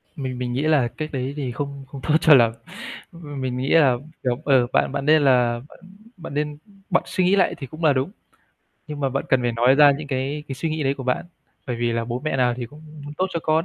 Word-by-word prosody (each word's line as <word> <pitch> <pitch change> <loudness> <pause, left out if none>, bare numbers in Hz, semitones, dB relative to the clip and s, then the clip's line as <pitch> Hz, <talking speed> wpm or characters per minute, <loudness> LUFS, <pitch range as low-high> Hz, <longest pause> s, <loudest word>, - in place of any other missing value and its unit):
Mình 130 -4 -4
mình 125 -1 -3
nghĩ 130 - -1
là 150 -5 +3
cách 155 +5 -6
đấy 135 0 -3
thì 130 -4 -3
không 140 +1 -6
không 135 -2 -9
tốt 155 - +1
cho 155 - +7
lắm. 115 -3 +5 0.6
M 145 -5 -8
mình 125 -1 -2
nghĩ 130 +2 -2
là, 140 -7 +5 0.3
kiểu, 125 +1 -1
ờ, 130 -4 +4
bạn - - +2
bạn 140 0 -3
nên 155 0 +5
là 125 -3 +3
bạn - - -17 0.4
bạn 165 -4 -9
nên 150 0 -2 0.3
bạn 180 - +3
suy 185 - 0
nghĩ 190 +2 +4
lại 190 - +3
thì 135 - -6
cũng 155 +5 -7
là 150 - +6
đúng. 135 +6 -1 0.8
Nhưng 150 -1 -6
mà 135 - +1
bạn 135 +1 -2
cần 130 -2 +3
phải 120 -1 0
nói 120 +3 +4
ra 145 0 +7
những 155 - -7
cái 140 +2 -3
cái 135 - -4
suy 160 +4 -3
nghĩ 155 -1 -2
đấy 135 0 +1
của 135 - -7
bạn, 130 +8 -1 0.4
bởi 120 -2 -3
vì 120 0 0
là 115 0 -1
bố 120 +2 -4
mẹ 155 - 0
nào 125 -2 +2
thì 120 -2 -5
cũng 150 +5 -15 0.2
muốn 145 - -8
tốt 185 +5 0
cho 170 - -3
con 155 +1 +2
135 Hz, 265 wpm, -23 LUFS, 125-150 Hz, 0.8 s, cho